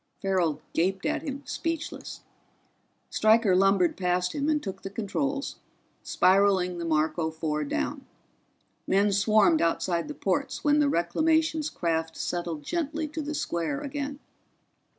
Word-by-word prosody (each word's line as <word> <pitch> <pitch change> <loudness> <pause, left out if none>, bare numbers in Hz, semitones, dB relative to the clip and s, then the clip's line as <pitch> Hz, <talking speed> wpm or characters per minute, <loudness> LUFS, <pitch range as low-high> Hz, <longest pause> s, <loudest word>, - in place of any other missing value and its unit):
Farrell 185 -6 0
gaped 190 +3 0
at 305 0 0
him, 285 -2 -5
speechless. 330 -1 -4 0.9
Stryker 220 -3 +4
lumbered 195 -2 +3
past 180 -1 0
him 290 +1 -1
and 305 -1 +2
took 195 -1 -6
the 195 - -6
controls, 275 +8 -3 0.4
spiraling 185 -2 +3
the 170 - -3
Marco 160 0 +1
Four 155 -1 -2
down. 145 - -3 0.8
Men 200 +2 +3
swarmed 215 - +4
outside 170 +1 0
the 300 - -6
ports - - -2
when 295 -1 +4
the 290 -1 +3
Reclamations 315 - +1
craft 160 -1 -2
settled 170 -4 -3
gently 315 - -2
to 310 +1 -4
the 305 +1 -4
square 170 - -2
again. 285 0 -4
195 Hz, 130 wpm, -27 LUFS, 175-290 Hz, 0.9 s, Stryker